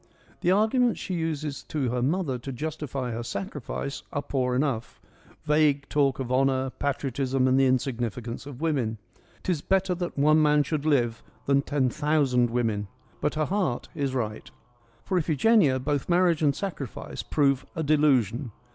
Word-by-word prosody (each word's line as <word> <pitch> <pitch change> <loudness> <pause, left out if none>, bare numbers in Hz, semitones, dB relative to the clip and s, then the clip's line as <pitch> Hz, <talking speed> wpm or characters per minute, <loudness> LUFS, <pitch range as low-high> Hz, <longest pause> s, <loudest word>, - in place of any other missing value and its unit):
The 175 - +1
argu 215 +7 +3
ments 245 -2 +2
she 185 - -4
uses 155 -4 -2
to 135 -6 -1
her 125 0 -1
mother 140 -1 0
to 135 +3 -6
justify 140 -2 -4
her 115 +1 -3
sacrifice 140 - -5
are 145 - -2
poor 130 -3 0
enough: 125 -4 -1 0.4
vague 150 -2 +2
talk 140 -3 +2
of 130 -2 -4
honour, 130 0 +2
patriotism 135 -2 -1
and 130 +1 +4
the 135 - +5
insignificance 120 -1 -2
of 140 -2 -9
women 130 -9 0
— - - -32
' - - -30
Tis 175 -5 -1
better 190 +1 +1
that 175 -3 -4
one 155 +2 +5
man 150 -1 +4
should 150 +1 -2
live 120 -6 +2 0.2
than 140 0 +3
ten 140 -2 0
thousand 140 -5 +2
women 115 -4 -1 0.2
'; - - -32
but 150 - 0
her 155 0 +1
heart 180 -9 -1
is 135 -2 -2
right. 110 -4 -3 0.6
For 185 - +1
Iphigenia 160 - +3
both 145 +3 -2
marriage 175 -2 +3
and 145 -3 +3
sacrifice 150 - -5
prove 140 -3 +1
a 160 - -1
delusion. 135 -5 +2
140 Hz, 170 wpm, -26 LUFS, 130-155 Hz, 0.6 s, the